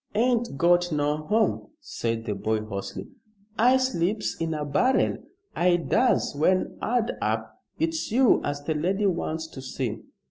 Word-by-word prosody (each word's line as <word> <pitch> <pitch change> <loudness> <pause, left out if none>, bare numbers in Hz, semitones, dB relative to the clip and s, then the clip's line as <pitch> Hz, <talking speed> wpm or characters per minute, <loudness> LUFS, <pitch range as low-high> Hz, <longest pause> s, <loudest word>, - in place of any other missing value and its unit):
"Ain't 235 - +1
got 175 +2 +3
no 150 -1 +1
home," 210 +9 0
said 115 - -3
the 105 - -1
boy, 110 +1 -1
hoarsely. 100 -2 -6 0.5
"I 250 +3 +5
sleeps 210 -5 -1
in 165 -1 -2
a 150 -1 -3
barrel, 250 - +2 0.4
I 175 0 +3
does, 235 - +1
when 185 +6 +1
'ard 235 0 0
up. - - -2 0.2
It's 325 -5 -1
you 250 +1 +4
as 145 0 -3
the 160 - -1
lady 185 +7 0
wants 165 -4 -1
to 135 - -9
see." 125 -4 -4
175 Hz, 150 wpm, -26 LUFS, 145-230 Hz, 0.5 s, I